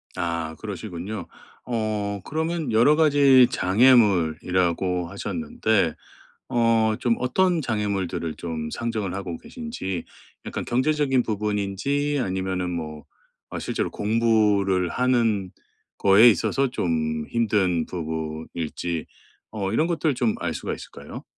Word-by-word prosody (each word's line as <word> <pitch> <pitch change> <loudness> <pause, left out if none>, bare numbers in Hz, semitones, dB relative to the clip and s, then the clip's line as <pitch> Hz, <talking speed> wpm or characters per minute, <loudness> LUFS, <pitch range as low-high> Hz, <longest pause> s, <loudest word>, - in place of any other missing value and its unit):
아 85 -2 -3
그러시군요. 100 -1 -6 0.4
어 110 -3 -2
그러면 160 -2 -2
여러 120 +7 +5
가지 140 -5 +6
장애물이라고 90 -5 +2
하셨는데 110 - -1 0.6
어 115 -3 +2
좀 120 -2 +2
어떤 175 +7 +2
장애물들을 100 -8 -2
좀 80 -2 -5
상정을 110 -6 -3
하고 95 -4 -5
계신지 230 - -5 0.4
약간 - - -4
경제적인 135 +1 +1
부분인지 105 +7 -1
아니면은 95 -2 -2
뭐 75 -3 -5 0.5
어 - - -3
실제로 - - -2
공부를 105 -4 +2
하는 115 -7 +1 0.5
거에 100 +5 +7
있어서 135 +7 +1
좀 80 -6 -1
힘든 100 -8 +1
부분일지 80 0 -4 0.4
어 100 -3 -3
이런 155 +9 +2
것들을 160 -4 0
좀 120 -3 +1
알 - - -3
수가 - - -4
있을까요? - - -9
105 Hz, 260 characters per minute, -24 LUFS, 90-125 Hz, 0.6 s, 거에